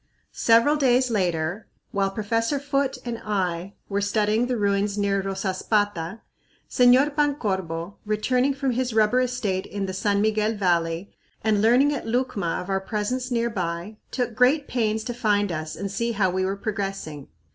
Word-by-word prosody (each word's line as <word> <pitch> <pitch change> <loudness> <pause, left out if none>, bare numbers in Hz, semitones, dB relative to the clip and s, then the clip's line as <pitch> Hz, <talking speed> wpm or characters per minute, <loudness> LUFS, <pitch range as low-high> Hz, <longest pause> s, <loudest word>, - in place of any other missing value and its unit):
Several 230 +6 +4
days 255 -3 +3
later, 175 -1 -1 0.2
while 195 -1 +1
Professor 230 +6 -1
Foote 280 -1 -1
and 235 -1 -4
I 185 -2 -2
were 200 0 -1
studying 215 +3 +1
the 250 -1 -1
ruins 200 0 0
near 200 -1 +1
Rosaspata, 195 0 -1 0.5
Señor 255 +4 +4
Pancorbo, 195 - -1
returning 250 +6 +1
from 270 -1 0
his 245 -1 -1
rubber 220 +3 +4
estate 230 -7 -1
in 200 -1 -3
the 190 - -4
San 200 +1 +1
Miguel 215 +1 +1
Valley 175 -2 0 0.3
and 210 -2 +2
learning 250 +6 +4
at 275 - -5
Lucma 225 -7 -1
of - - -12
our 195 0 0
presence 225 +6 -2
near 235 -1 0
by, 180 +2 -4
took 245 -3 -2
great 265 +5 +3
pains 220 -3 0
to 240 - -4
find 205 -5 +1
us 155 -1 -4
and 200 -1 -4
see 235 +3 -1
how 195 -4 +1
we 185 +1 0
were 195 +1 -1
progressing. 195 -8 -4
210 Hz, 160 wpm, -24 LUFS, 195-245 Hz, 0.5 s, Several